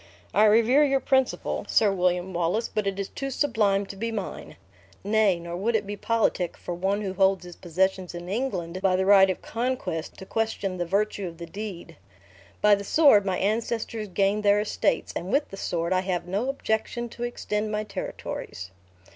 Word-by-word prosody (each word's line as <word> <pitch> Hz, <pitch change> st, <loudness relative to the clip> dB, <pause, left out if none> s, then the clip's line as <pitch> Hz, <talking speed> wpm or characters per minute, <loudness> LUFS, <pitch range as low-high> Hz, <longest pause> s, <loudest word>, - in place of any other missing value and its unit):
I 210 Hz, -, +5 dB
revere 230 Hz, +7 st, +5 dB
your 275 Hz, -2 st, +3 dB
principle, 265 Hz, -1 st, 0 dB
Sir 210 Hz, -3 st, +4 dB
William 180 Hz, 0 st, 0 dB
Wallace; 175 Hz, +6 st, 0 dB
but 215 Hz, -2 st, -2 dB
it 195 Hz, 0 st, -2 dB
is 200 Hz, -, -2 dB
too 275 Hz, -1 st, -4 dB
sublime 220 Hz, -8 st, +1 dB
to 195 Hz, -, -9 dB
be 230 Hz, +4 st, -3 dB
mine. 210 Hz, -4 st, -6 dB, 0.5 s
Nay, 205 Hz, -3 st, +3 dB
nor 170 Hz, 0 st, -6 dB
would 220 Hz, +6 st, 0 dB
it 215 Hz, -1 st, +1 dB
be 205 Hz, +1 st, -4 dB
politic 210 Hz, -5 st, 0 dB
for 175 Hz, -, -5 dB
one 190 Hz, +4 st, -1 dB
who 195 Hz, -2 st, -3 dB
holds 190 Hz, -1 st, +2 dB
his 175 Hz, -1 st, -10 dB
possessions 185 Hz, +1 st, -1 dB
in 175 Hz, 0 st, -7 dB
England 185 Hz, -5 st, -3 dB
by 190 Hz, -2 st, +3 dB
the 190 Hz, +1 st, +1 dB
right 195 Hz, -1 st, +7 dB
of 185 Hz, -, -3 dB
conquest 225 Hz, -9 st, -3 dB
to 190 Hz, -, -9 dB
question 205 Hz, -3 st, -2 dB
the 175 Hz, -, -1 dB
virtue 200 Hz, +1 st, 0 dB
of 165 Hz, -1 st, -9 dB
the 170 Hz, -, -7 dB
deed. 195 Hz, 0 st, -8 dB, 0.7 s
By 210 Hz, 0 st, +7 dB
the 200 Hz, 0 st, +1 dB
sword 210 Hz, -5 st, +5 dB
my 185 Hz, -1 st, 0 dB
ancestors 220 Hz, +1 st, -1 dB
gained 200 Hz, +2 st, +1 dB
their 205 Hz, 0 st, +4 dB
estates; 210 Hz, -, 0 dB
and 180 Hz, +3 st, -4 dB
with 290 Hz, +2 st, +1 dB
the -, -, -8 dB
sword 170 Hz, -1 st, -1 dB
I 185 Hz, -, +2 dB
have 185 Hz, -2 st, -2 dB
no 205 Hz, +8 st, -1 dB
objection 240 Hz, -2 st, -2 dB
to 235 Hz, -, -7 dB
extend 215 Hz, -3 st, -2 dB
my 210 Hz, 0 st, -1 dB
territories." 95 Hz, -, -6 dB
200 Hz, 190 wpm, -26 LUFS, 185-220 Hz, 0.7 s, right